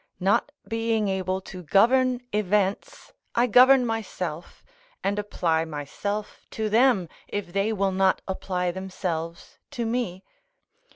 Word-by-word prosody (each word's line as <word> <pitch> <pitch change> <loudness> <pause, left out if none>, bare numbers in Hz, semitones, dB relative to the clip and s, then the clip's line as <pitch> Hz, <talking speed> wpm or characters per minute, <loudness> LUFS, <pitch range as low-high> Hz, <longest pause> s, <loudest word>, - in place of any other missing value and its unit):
Not 205 +9 +2 0.2
being 225 -2 0
able 190 0 -1
to 185 -1 -9
govern 245 - +3
events, 210 - -1 0.2
I 240 - +4
govern 250 +2 +6
myself, 185 -8 -4 0.4
and 200 +1 0
apply 170 -6 0
myself 165 +7 -5
to 220 -1 0
them, 230 -5 +4 0.2
if 190 -4 -5
they 200 +2 +1
will 195 -2 +1
not 190 0 +2
apply 180 -2 -2
themselves 175 -3 -5
to 240 -5 -3
me. 225 -6 -2
200 Hz, 120 wpm, -25 LUFS, 185-225 Hz, 0.4 s, govern